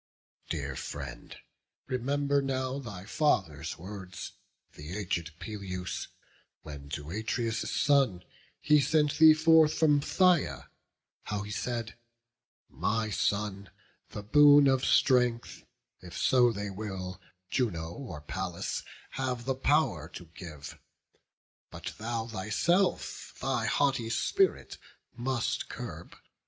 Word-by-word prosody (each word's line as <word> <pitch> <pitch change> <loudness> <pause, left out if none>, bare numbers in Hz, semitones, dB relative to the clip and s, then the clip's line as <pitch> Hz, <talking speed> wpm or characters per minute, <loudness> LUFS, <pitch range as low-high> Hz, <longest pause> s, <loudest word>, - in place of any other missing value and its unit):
Dear - - -3
friend, - - -7 0.5
remember 140 +3 0
now 130 0 -2
thy 100 -8 -8
father's 95 - 0
words, 95 +1 -8 0.4
The 75 +6 -7
aged 85 -5 -3
Peleus, 90 -1 -5 0.6
when 70 -2 -9
to 75 +1 -5
Atreus' 110 +2 -2
son 135 -11 +2 0.4
He 150 -1 +4
sent 150 0 +2
thee 160 -1 +9
forth 160 -1 +5
from 150 -3 +4
Phthia, 170 - +2 0.6
how 105 0 -3
he 105 - -7
said, 115 +1 -4 0.7
'My 110 0 -1
son, 100 0 -1 0.4
the 105 - -7
boon 145 +5 +7
of 135 -1 +3
strength, 125 -3 +2 0.3
if 90 -1 -10
so 125 -2 +4
they 100 -2 -4
will, 95 -2 -6 0.3
Juno 85 -11 -1
or 85 - -8
Pallas 75 - -4 0.3
have 125 -3 -3
the 135 - +1
pow'r 130 - +1
to 85 - -8
give; 80 -5 -9 0.9
But - - -7
thou 115 0 -2
thyself 115 - 0
thy - - -1
haughty 130 -5 +1
spirit 390 - +1 0.4
must 120 0 -2
curb. - - -8
115 Hz, 110 wpm, -30 LUFS, 95-140 Hz, 0.9 s, thee